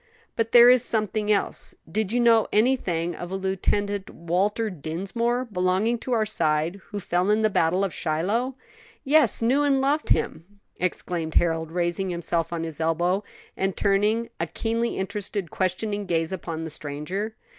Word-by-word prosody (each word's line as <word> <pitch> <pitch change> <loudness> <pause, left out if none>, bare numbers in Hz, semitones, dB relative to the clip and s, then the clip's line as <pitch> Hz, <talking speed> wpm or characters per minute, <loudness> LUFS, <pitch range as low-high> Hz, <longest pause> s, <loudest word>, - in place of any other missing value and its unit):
"But 225 -1 -1
there 240 0 +9
is 250 -1 +5
something 215 -2 0
else. 200 - -1
Did 205 +4 -1
you 245 - +1
know 230 -2 +5
anything 195 -8 +1
of 175 - -7
a 190 - -3
Lieutenant 195 +1 -1
Walter 200 +6 -1
Dinsmore, 195 - -2
belonging 200 +3 0
to 255 - -6
our 220 -2 +2
side, 165 -1 0
who 205 - -5
fell 180 +1 0
in 215 +1 +3
the 215 - +3
battle 180 +2 +2
of 195 - -1
Shiloh?" 205 +12 -1 0.5
"Yes; 280 -6 +3
knew 260 +5 +3
and 280 -2 +3
loved 285 +3 0
him!" 190 +6 -1 0.2
exclaimed 175 -2 -2
Harold, 165 -2 +1
raising 175 +2 -1
himself 170 -1 -1
on 170 -1 -2
his 160 -2 -5
elbow, 175 +5 +1 0.3
and 195 -1 -1
turning 210 +3 +2
a 165 - -1
keenly 230 +7 -2
interested, 195 -2 -3
questioning 200 +2 -1
gaze 165 -1 0
upon 165 -3 -4
the 160 - -5
stranger. 160 +10 -4
195 Hz, 160 wpm, -25 LUFS, 170-225 Hz, 0.5 s, there